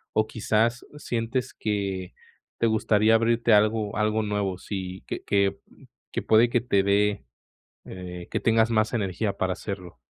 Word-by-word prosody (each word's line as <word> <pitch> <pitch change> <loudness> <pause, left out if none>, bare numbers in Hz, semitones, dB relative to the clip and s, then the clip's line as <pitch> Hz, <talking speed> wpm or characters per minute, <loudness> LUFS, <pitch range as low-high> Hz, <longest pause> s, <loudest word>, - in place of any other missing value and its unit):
¿O 110 0 +2
quizás 115 +2 0
sientes 125 -1 -3
que 100 -3 -3 0.5
te 115 - +3
gustaría 110 0 +3
abrirte 115 +1 +2
algo 105 0 +3
algo 105 +1 +1
nuevo? 100 -3 -2
Sí, 95 -2 -6
que - - -5
que, 100 -1 +1
mm, - - -20 0.3
que - - -2
puede 115 +2 +4
que 120 0 +1
te 100 -5 +2
dé, 100 +1 +1 0.6
eh, 90 -1 -8
que - - 0
tengas 115 0 +3
más 110 0 +1
energía 100 -1 -1
para 95 0 0
hacerlo. 90 - -7
105 Hz, 155 wpm, -26 LUFS, 100-115 Hz, 0.6 s, puede